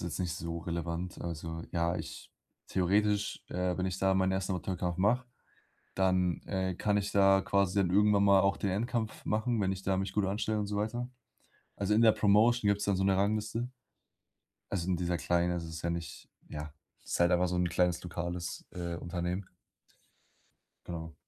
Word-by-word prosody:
jetzt 85 -3 -4
nicht 90 -3 -1
so 85 0 -4
relevant. 85 +1 -4
Also 80 -1 -5
ja, 85 +1 0
ich - - -8 0.4
theoretisch, 100 +3 +1
äh, 90 0 -1
wenn 95 - -1
ich 95 0 -2
da 95 0 +3
meinen 95 0 +2
1. 95 0 -1
Amateurkampf 90 -1 -2
mache, 115 +7 +2 0.7
dann, 95 -2 +1
äh, 95 -1 -1
kann 105 +3 +1
ich 100 0 -2
da 95 -1 +5
quasi 100 -1 +1
dann 95 - +2
irgendwann 100 +2 +4
mal 100 -1 +6
auch 100 +1 +2
den 100 - -1
Endkampf 110 +3 -2
machen, 110 +2 0
wenn 95 0 +1
ich 95 0 -6
da 95 0 +1
mich 95 0 -2
gut 105 -2 +1
anstelle 105 +2 -1
und 105 - -1
so 105 0 -3
weiter. 115 +4 -2 0.7
Also 100 +1 +1
in 110 - +4
der 110 - +8
Promotion 110 +3 +4
gibt's 100 0 +1
dann 100 - +2
so 95 - 0
'ne 95 -1 +3
Rangliste. 110 +4 0 1.0
Also, 90 -3 -2
in 90 - +2
dieser 90 0 -1
kleinen, 85 +1 +1
das 85 -1 -2
ist 80 0 -7
ja 85 - 0
nicht 85 -1 -6 0.2
ja, 75 0 -6 0.3
ist - - -3
halt 85 0 +5
einfach 90 +1 +3
so 90 - -1
'n 90 0 +2
kleines 90 0 +1
lokales, 85 0 -4
äh, 85 -1 -4
Unternehmen. 90 +2 -3 1.4
Genau. 80 -2 -6
95 Hz, 185 wpm, -31 LUFS, 85-100 Hz, 1.4 s, der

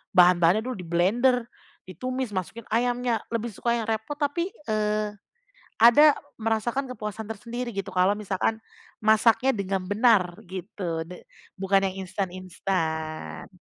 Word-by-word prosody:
bahan-bahannya 180 +2 +6
dulu, 255 0 -3
diblender, 200 +9 +2 0.4
ditumis, 255 +6 -4
masukin 190 +5 -4
ayamnya, 245 0 +1
lebih 230 +1 -1
suka 235 +4 0
yang 235 - -1
repot, 220 +6 -2
tapi, 315 +4 0 0.2
eee, 210 0 0 0.7
ada 285 +6 +8 0.2
merasakan 225 +4 -1
kepuasan 215 -2 -5
tersendiri 235 +3 -5
gitu, 195 -1 -3
kalau 185 +2 +4
misalkan 210 +2 -1 0.4
masaknya 220 +4 +4
dengan 195 -2 -2
benar 205 -4 +3
gitu, 180 -2 -4
de 180 +1 -11 0.3
bukan 195 0 +2
yang 190 0 -5
instan-instan. 180 -4 -3
210 Hz, 120 wpm, -26 LUFS, 185-235 Hz, 0.7 s, ada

